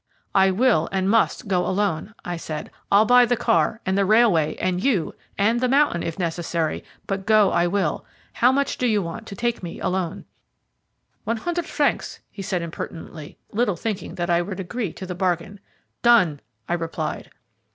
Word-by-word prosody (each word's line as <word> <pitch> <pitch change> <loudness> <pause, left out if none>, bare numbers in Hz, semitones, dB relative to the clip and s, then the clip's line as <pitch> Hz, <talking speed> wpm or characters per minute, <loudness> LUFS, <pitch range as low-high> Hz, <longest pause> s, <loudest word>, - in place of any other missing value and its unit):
"I 195 -1 +5
will, 200 -4 +2
and 190 -1 0
must, 225 +1 +2
go 180 -2 +1
alone," 200 0 -1
I 175 - -3
said. 155 -2 -6 0.2
"I'll 205 +2 +6
buy 245 +2 +7
the 245 0 +1
car, 170 +6 +1
and 190 0 0
the 200 - +3
railway, 195 -7 +4
and 185 0 -1
you, 205 - +1 0.2
and 225 +4 +2
the 255 - +1
mountain, 275 - +3
if 165 -1 -4
necessary, 170 -2 -2 0.2
but 195 0 -4
go 215 -3 +5
I 170 +1 +2
will. 180 -4 -1 0.3
How 245 +2 +4
much 280 0 0
do 250 - +2
you 210 -4 +2
want 220 +7 -7
to 200 - -7
take 235 +2 -1
me 175 -2 -7
alone?" 180 -2 -2 1.0
"One 230 - -1
hundred 345 +6 -3
francs," 290 -2 -1
he 200 - -8
answered 180 -2 -2
impertinently, 160 -2 -8
little 215 -3 +1
thinking 210 +3 -4
that 175 0 -1
I 170 0 +3
would 190 +2 -5
agree 195 +1 -3
to 190 - -8
the 180 - -5
bargain. 180 +2 -2 0.4
"Done!" 185 -12 +4 0.3
I - - -1
replied. 165 -1 -3
190 Hz, 180 wpm, -23 LUFS, 170-225 Hz, 1.0 s, buy